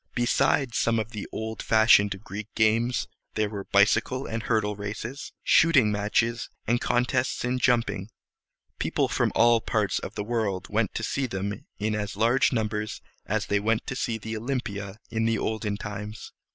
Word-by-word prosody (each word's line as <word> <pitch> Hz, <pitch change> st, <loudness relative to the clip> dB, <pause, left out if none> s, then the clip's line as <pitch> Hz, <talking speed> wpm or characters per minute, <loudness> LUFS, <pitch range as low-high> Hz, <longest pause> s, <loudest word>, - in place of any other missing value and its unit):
Besides 120 Hz, +1 st, +2 dB
some 115 Hz, 0 st, +2 dB
of 110 Hz, 0 st, -2 dB
the 105 Hz, -3 st, -6 dB
old 110 Hz, 0 st, -4 dB
fashioned 105 Hz, -3 st, +4 dB
Greek 100 Hz, +2 st, -6 dB
games, 115 Hz, +2 st, +2 dB, 0.3 s
there 105 Hz, -1 st, 0 dB
were 100 Hz, -2 st, -5 dB
bicycle 110 Hz, +6 st, +2 dB
and 115 Hz, 0 st, -3 dB
hurdle 105 Hz, -2 st, 0 dB
races, 110 Hz, +6 st, -6 dB
shooting 140 Hz, -10 st, +5 dB
matches, 110 Hz, +3 st, 0 dB, 0.2 s
and 120 Hz, +2 st, +1 dB
contests 125 Hz, +1 st, 0 dB
in 125 Hz, +1 st, 0 dB
jumping. 120 Hz, -5 st, +1 dB, 0.7 s
People -, -, +1 dB
from -, -, +1 dB
all 115 Hz, 0 st, +5 dB
parts 105 Hz, -3 st, 0 dB
of 100 Hz, -, -7 dB
the 105 Hz, -, -2 dB
world 105 Hz, -4 st, -1 dB
went -, -, 0 dB
to -, -, -2 dB
see 135 Hz, -1 st, -1 dB
them 100 Hz, -1 st, -4 dB
in 110 Hz, +1 st, -1 dB
as 105 Hz, -1 st, -3 dB
large 120 Hz, +4 st, +3 dB
numbers 110 Hz, -3 st, -2 dB, 0.3 s
as 105 Hz, +1 st, 0 dB
they 100 Hz, -, +1 dB
went 110 Hz, +2 st, 0 dB
to 115 Hz, -3 st, -3 dB
Olympia 110 Hz, -5 st, -4 dB
in 110 Hz, -1 st, 0 dB
the 115 Hz, 0 st, +2 dB
olden 110 Hz, -2 st, -2 dB
times. 105 Hz, +1 st, -7 dB
110 Hz, 160 wpm, -26 LUFS, 105-120 Hz, 0.7 s, shooting